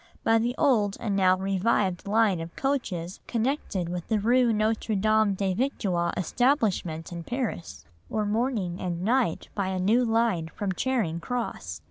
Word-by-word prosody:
by 225 0 +4
the 240 +2 -1
old 215 -8 +2
and 210 -4 -1
now 185 -1 +4
revived 195 -1 0
line 210 -3 +3
of 165 +1 -7
coaches 195 -11 -2
connected 230 - -1
with 175 0 -5
the 220 -2 +1
rue 240 +3 +3
Notre 220 0 0
Dame 215 0 +3
des 190 -1 0
Victoires 185 -7 -1
establishment 190 - 0
in 170 -1 -6
Paris, 240 -6 -4 0.2
or 215 -1 -1
morning 210 -5 -1
and 175 -1 -3
night 235 -4 +1
by 200 -2 -1
a 190 0 -2
new 220 +7 +3
line 225 -8 +1
from 200 -2 -2
Charing 195 -6 -1
Cross. 170 - -4
205 Hz, 155 wpm, -27 LUFS, 180-235 Hz, 0.2 s, by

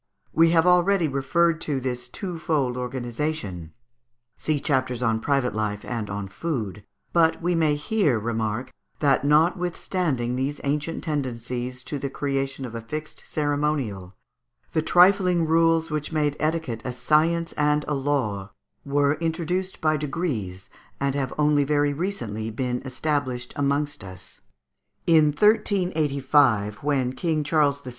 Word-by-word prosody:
We 165 0 +5
have 165 0 +4
already 180 0 +4
referred 160 +4 +1
to 140 -3 -1
this 125 -1 -4
twofold 160 -7 -2
organization 120 - -4 0.7
(vide 150 -3 -1
chapters 130 -4 0
on 115 -2 +2
Private 135 -1 +1
Life 105 -1 -2
and 115 -4 -4
on 100 0 -4
Food), 105 - -4 0.3
but 165 -1 +4
we 175 +1 0
may 160 -3 +3
here 150 - +1
remark 115 +2 -2 0.2
that, 140 -3 +2
notwithstanding 160 -4 +1
these 135 +3 -2
ancient 150 +3 -2
tendencies 125 -4 -3
to 145 - -4
the 140 +1 -3
creation 135 -1 -2
of 120 - -8
a 115 - -5
fixed 155 +7 -6
ceremonial, 145 -11 -1 0.6
the 160 - +1
trifling 180 0 +4
rules 165 0 +3
which 150 0 -2
made 150 -2 +1
etiquette 155 -7 -1
a 125 - -4
science 165 +5 +2
and 150 0 +1
a 150 - 0
law, 125 -9 -1 0.3
were 145 +1 +1
introduced 175 +3 -2
by 155 -1 +2
degrees, 135 - -3 0.3
and 140 -1 0
have 135 -2 -2
only 150 -1 +3
very 145 0 +1
recently 120 - -3
been 125 +2 -2
established 130 -2 -2
amongst 145 0 -1
us. 95 -1 -8 0.6
In 160 -2 +6
1385, 145 - +2
when 135 -3 0
King 160 0 -1
Charles 145 -2 +2
VI. 130 - -8
145 Hz, 135 wpm, -25 LUFS, 125-160 Hz, 0.7 s, In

